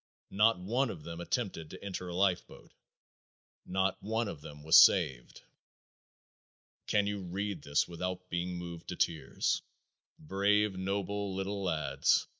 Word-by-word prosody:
Not 105 +2 +4
one 120 +9 0
of 80 -8 -7
them 85 +1 -6
attempted 85 -6 -2
to - - -10
enter 90 -2 -4
a 90 - -5
lifeboat. 95 -1 -1 0.9
Not 95 +1 0
one 110 +2 -1
of 80 -7 -6
them 75 0 -10
was 80 - +9
saved." - - +1 1.4
Can 105 -1 +3
you 100 0 -2
read 95 0 -3
this 70 0 +1
without 90 +1 -4
being 90 0 -2
moved 85 -1 -7
to - - -4
tears? 75 -6 0 0.6
Brave, 100 +4 +1
noble 100 +1 -2
little 100 +1 -3
lads! 80 -5 +2
95 Hz, 135 wpm, -32 LUFS, 85-100 Hz, 1.4 s, was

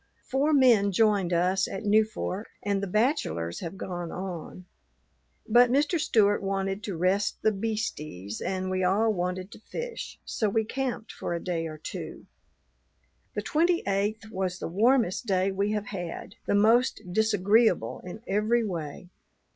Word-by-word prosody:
Four 275 +4 +1
men 240 -8 +5
joined 200 -3 +2
us 180 +3 +2
at 195 - -5
Newfork, 215 -1 +1 0.2
and 200 -1 0
the 200 - -2
bachelors 180 - 0
have 175 +2 -6
gone 175 -2 -5
on; 185 -1 -6 0.8
but 240 +2 +6
Mr. 290 +6 +2
Stewart 205 -7 +3
wanted 195 0 -2
to 195 -5 -4
rest 190 +4 +1
the 220 - +4
"beasties" 195 - -4
and 185 0 -2
we 185 0 0
all 210 +5 +3
wanted 180 +1 -3
to - - -11
fish, 475 - -6
so 215 - 0
we 220 +2 +1
camped 255 -1 -3
for 175 - -4
a - - -2
day 165 -3 -2
or 155 -1 -7
two. 155 - -7 1.1
The - - -2
twenty 340 +3 +2
eighth 210 +3 -1
was 185 -2 -2
the - - -4
warmest 225 +3 +2
day 190 0 +2
we 200 +2 0
have 210 -1 -2
had, 180 -5 -6
the - - +2
most 225 +5 +4
disagreeable 220 +1 +3
in 195 +5 -9
every 215 +4 +2
way. 175 -1 -5
200 Hz, 155 wpm, -27 LUFS, 185-220 Hz, 1.1 s, but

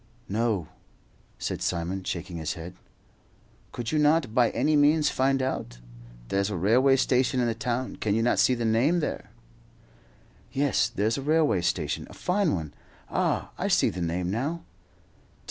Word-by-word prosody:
"No," 105 -5 -1 0.7
said - - -4
Simon, 90 +2 -2
shaking 85 -1 -4
his 80 0 -3
head. 85 +2 -8 1.0
"Could 120 -1 -4
you 155 - +1
not 150 -5 +3
by 120 -1 +4
any 155 - +1
means 150 +1 +4
find 135 0 +1
out? - - -3 0.5
There's 100 +1 0
a 105 - -3
railway 125 +9 +4
station 130 -1 +2
in 125 - +2
the 115 - 0
town; 120 +3 -3
can 105 -1 0
you 115 - +1
not 120 - +2
see 130 - +4
the 120 -1 -2
name 125 +10 +2
there?" 155 - -4 1.2
"Yes, 140 0 +1
there's 110 +6 -1
a - - -4
railway 150 - +2
station, 85 -4 -2
a - - -12
fine 185 - +1
one. 80 -4 -5 0.4
Ah, - - 0
I - - 0
see - - +3
the 90 - -6
name 90 +2 -1
now. 145 +10 -2
120 Hz, 165 wpm, -27 LUFS, 95-140 Hz, 1.2 s, by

